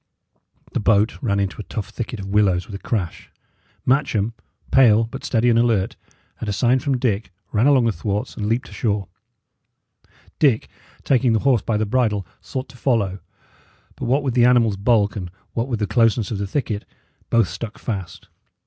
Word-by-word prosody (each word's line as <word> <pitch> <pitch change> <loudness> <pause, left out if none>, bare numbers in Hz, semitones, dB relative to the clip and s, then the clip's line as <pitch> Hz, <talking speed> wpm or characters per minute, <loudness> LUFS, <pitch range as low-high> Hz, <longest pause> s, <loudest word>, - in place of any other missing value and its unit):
The - - 0
boat 105 +3 +2
ran 100 -6 +1
into 100 +2 -2
a - - -7
tough 105 -2 -5
thicket 120 -1 -5
of 95 - -5
willows 95 -3 +2
with - - -11
a 100 - -6
crash. 95 -8 -3 0.6
Matcham, 125 -5 +1 0.4
pale, 115 -4 +6
but 120 +4 -7
steady 120 0 +1
and 115 -1 +4
alert, 115 -5 +1 0.5
at 110 - -3
a - - 0
sign 125 +5 +3
from 135 0 0
Dick, 110 -5 -1 0.2
ran 110 +5 +3
along 135 -4 +5
the 115 - +3
thwarts 105 0 -3
and 105 - -3
leaped 120 +4 0
ashore; 105 -4 -2 1.3
Dick, 135 -8 +3 0.3
taking 125 -3 +3
the 110 - +3
horse 130 -6 +4
by 110 0 -1
the 110 - 0
bridle, 105 -4 +1 0.2
sought 130 -1 -5
to 125 - -14
follow, 105 -7 0 0.8
but - - -5
what 135 +4 +2
with 130 -3 -1
the 120 -1 +4
animal's 120 -4 +4
bulk, 105 0 +2
and 90 -4 -5 0.2
what 115 +2 -1
with 120 -4 -1
the 105 - 0
closeness 115 -1 +2
of 105 - -2
the 100 - -2
thicket, 105 -2 -2 0.5
both 115 -4 +3
stuck 110 +3 -6
fast. 95 -7 -5
115 Hz, 185 wpm, -22 LUFS, 100-125 Hz, 1.3 s, pale